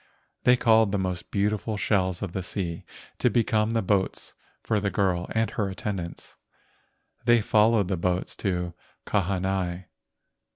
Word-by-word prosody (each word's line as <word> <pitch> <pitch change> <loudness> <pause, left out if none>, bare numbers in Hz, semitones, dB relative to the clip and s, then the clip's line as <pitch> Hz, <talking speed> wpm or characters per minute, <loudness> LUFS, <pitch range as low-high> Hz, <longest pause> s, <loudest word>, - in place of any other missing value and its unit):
They 125 0 +6
called 110 -3 +4
the 100 - +1
most 90 -3 -3
beautiful 105 +1 -1
shells 95 -3 0
of 100 - -4
the 95 - -3
sea 90 -2 -4 0.3
to - - +3
become 110 -1 +1
the 115 - +1
boats 95 0 0 0.3
for 110 - +1
the 100 0 0
girl 95 -3 0
and 110 0 +1
her 105 -3 -1
attendants. 95 -3 -5 0.9
They 120 0 +6
followed 110 -1 +3
the 95 -1 -1
boats 90 +2 -1
of 90 -3 -1 0.3
Kahanai. 95 -2 -1
100 Hz, 140 wpm, -26 LUFS, 90-110 Hz, 0.9 s, They